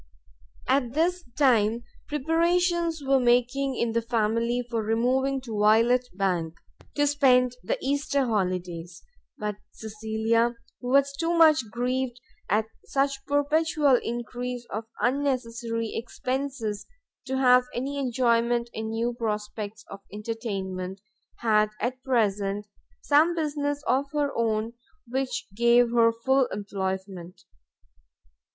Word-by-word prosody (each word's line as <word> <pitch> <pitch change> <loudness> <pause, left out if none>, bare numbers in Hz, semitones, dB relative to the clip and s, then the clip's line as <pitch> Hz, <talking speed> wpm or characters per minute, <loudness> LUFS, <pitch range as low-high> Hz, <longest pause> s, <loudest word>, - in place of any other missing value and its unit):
At 255 -3 +1
this 350 +4 +1
time, 235 -4 +3 0.2
preparations 335 +2 +1
were 270 0 +4
making 250 +2 +2
in 235 - 0
the 230 +1 +1
family 230 +1 0
for 230 -2 -1
removing 255 +5 +1
to 225 -5 -5
Violet 230 +4 +4
bank 175 -4 -1 0.4
to 290 - +3
spend 250 -4 +3
the - - -1
Easter 280 0 +1
holidays: 180 -5 -2 0.3
but 210 -1 -3 0.2
Cecilia, 220 +2 0 0.2
who 245 - -7
was 280 +1 +3
too 330 +4 -1
much 310 -8 +5
grieved 250 +1 -2 0.3
at 215 +2 +2 0.2
such 275 0 -1
perpetual 290 -1 +2
encrease 240 +1 -4
of 215 +2 -4 0.2
unnecessary 240 -4 -1
expences 245 -2 -3 0.4
to 265 0 -1
have 250 -1 +5
any 275 +3 -3
enjoyment 235 -2 +1
in 220 0 -4
new 230 +2 -1
prospects 215 -1 -4
of 195 - -7
entertainment, 195 -4 -4 0.4
had 215 -2 +3
at 255 +1 -2
present 210 -5 0 0.4
some 310 +4 +4
business 290 -2 -2
of 265 +3 +2
her 290 -1 0
own 225 0 0 0.3
which 255 0 -2
gave 235 +2 +4
her 230 -1 +5
full 260 +3 +2
employment. 190 -3 -5
240 Hz, 115 wpm, -26 LUFS, 220-275 Hz, 0.4 s, much